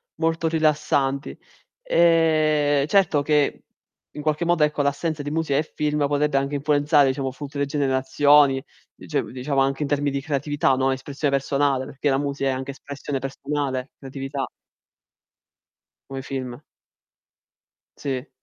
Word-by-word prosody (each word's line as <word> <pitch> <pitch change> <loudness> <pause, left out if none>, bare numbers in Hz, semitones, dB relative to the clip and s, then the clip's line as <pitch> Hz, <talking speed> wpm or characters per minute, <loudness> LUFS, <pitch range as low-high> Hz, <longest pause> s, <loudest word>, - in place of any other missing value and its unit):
molto 165 0 0
rilassanti. 150 - 0 0.5
Ehm, 155 -4 +3
certo 185 -6 +3
che 145 0 +1 0.5
in 150 - -7
qualche 155 +2 0
modo 175 -2 +3
ecco 150 -1 +1
l'assenza 145 +2 -1
di 145 - -4
musica 155 -2 0
e - - +1
film 150 -1 0
potrebbe 145 0 +1
anche 140 +1 -1
influenzare 145 0 +3
diciamo 130 0 -2
tutte 140 +1 -4
generazioni, 140 0 +3 0.3
dice - - -2
diciamo 135 +2 -3
anche 135 +2 0
in - - -2
termini 145 0 0
di 140 0 -2
creatività, 145 -1 0
no. 135 +1 +1
Espressio 140 +2 -2
personale, 140 -1 +1
perché 145 +1 -2
la 135 - +2
musica 140 -1 -1
è - - +2
anche 130 +1 -4
espressione 140 0 -6
personale, 135 -1 -3
creatività. 135 0 -5 1.6
Come 135 0 -5
film. 130 -2 -5 1.4
Sì. 135 -1 -4
145 Hz, 135 wpm, -23 LUFS, 135-150 Hz, 1.6 s, Ehm